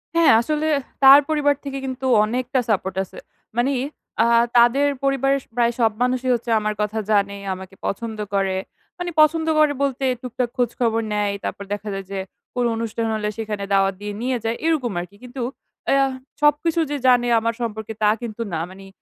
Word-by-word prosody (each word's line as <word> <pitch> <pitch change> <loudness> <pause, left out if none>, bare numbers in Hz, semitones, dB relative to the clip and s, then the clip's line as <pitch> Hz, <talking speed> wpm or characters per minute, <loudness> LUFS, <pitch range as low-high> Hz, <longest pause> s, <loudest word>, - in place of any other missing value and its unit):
হ্যাঁ 335 -1 +6
আসলে, 305 +5 -1 0.4
তার 270 +1 +10
পরিবার 290 -2 +2
থেকে 275 -1 -5
কিন্তু 260 0 -5 0.2
অনেকটা 250 +4 -1
support 190 -3 0
আছে। - - -12 0.4
মানে 255 +1 +1 0.4
আ - - +3 0.3
তাদের 250 +5 +5 0.2
পরিবারের 275 0 +2
স - - -25
প্রায় 235 -1 +2
সব 225 -1 +4
মানুষই 255 0 +1
হচ্ছে 235 0 -6
আমার 215 0 -1
কথা 210 +1 -1
জানে, 200 -1 +2 0.2
আমাকে 190 +1 -10
পছন্দ 220 +2 -3 0.2
করে। 195 -1 +1 0.4
মানে 355 -1 -3
পছন্দ 320 +1 +3
করে 300 -2 +4
বলতে 270 0 -1 0.2
টুকটাক 250 -1 -2
খোঁজখবর 235 -2 +1
নেয়। 205 -1 0
তারপর 200 - -4
দেখা 205 +1 -6
যায় 195 -1 -5
যে, 195 - -3 0.4
কোনো 245 -1 +1
অনুষ্ঠান 230 0 -2
হলে 210 -1 -1
সেখানে 210 -2 -4
দাওয়াত 195 0 +3
দিয়ে 205 0 -4
নিয়ে 255 0 0
যায়। 225 +1 -1
এইরকম 300 -8 +1
আরকি। 180 +3 -8
কিন্তু, 250 +1 -7 0.5
এআ 275 - +4 0.4
সবকিছু 295 +3 +3
যে 290 - -1
জানে 245 -1 +5
আমার 230 +1 -1
সম্পর্কে 220 -1 -4
তা 210 - +6
কিন্তু 230 -1 -6
না। 160 - -1
মানে, 195 +1 -12
240 Hz, 175 wpm, -22 LUFS, 210-275 Hz, 0.5 s, তার